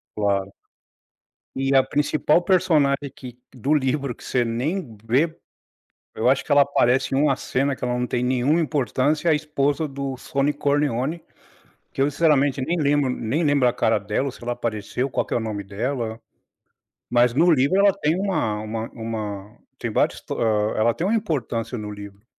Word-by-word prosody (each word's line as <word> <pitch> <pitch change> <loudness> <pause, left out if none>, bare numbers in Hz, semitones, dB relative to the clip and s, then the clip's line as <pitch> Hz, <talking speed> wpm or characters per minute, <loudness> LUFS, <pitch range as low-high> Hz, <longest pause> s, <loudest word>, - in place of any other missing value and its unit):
Claro. 100 -2 0 1.0
E 135 +1 0
a 135 - +6
principal 150 +4 +1
personagem 155 -7 +2
que 125 -3 -11 0.2
do 130 +4 0
livro, 140 -3 0
que - - -16
você 125 -2 0
nem 125 - -3
vê, 140 +9 +1 0.8
eu 115 - +2
acho 135 +1 +2
que - - -18
ela 145 0 +7
aparece 135 -2 +2
em - - +2
uma 145 -3 +3
cena 135 +2 -1
que - - -12
ela 125 0 0
não 125 0 -1
tem 120 0 -1
nenhuma 130 +6 +2
importância, 150 +1 0
é - - +5
a - - +4
esposa 150 0 -1
do 135 -1 -4
Sonny 140 +3 -1
Corleone, 145 +2 0 0.7
que - - -5
eu 140 - +4
sinceramente 145 -3 +2
nem 170 +5 -1
lembro 145 -2 +2
nem 125 +6 -1
lembro 145 -4 +3
a - - +1
cara 115 -2 +1
dela, 105 +6 -2
ou 135 - -3
se - - -15
ela 120 +1 -2
apareceu, 120 +3 -3
qual - - -1
que - - -3
é - - +2
o - - 0
nome 105 -3 -4
dela. 115 +3 -3 0.9
Mas 120 0 +3
no 160 +8 +3
livro 145 +4 +3
ela 200 0 +5
tem 170 -3 0
uma 185 - -1
uma 110 +1 -5
uma 110 -3 -6 0.2
tem - - -3
vários - - +1
to - - -6
ah, 110 -1 +1
ela 115 +2 +3
tem 170 - -3
uma 215 - +1
importância 125 - -2
no 105 -1 -6
livro. 100 0 -11
135 Hz, 190 wpm, -23 LUFS, 115-150 Hz, 1.0 s, ela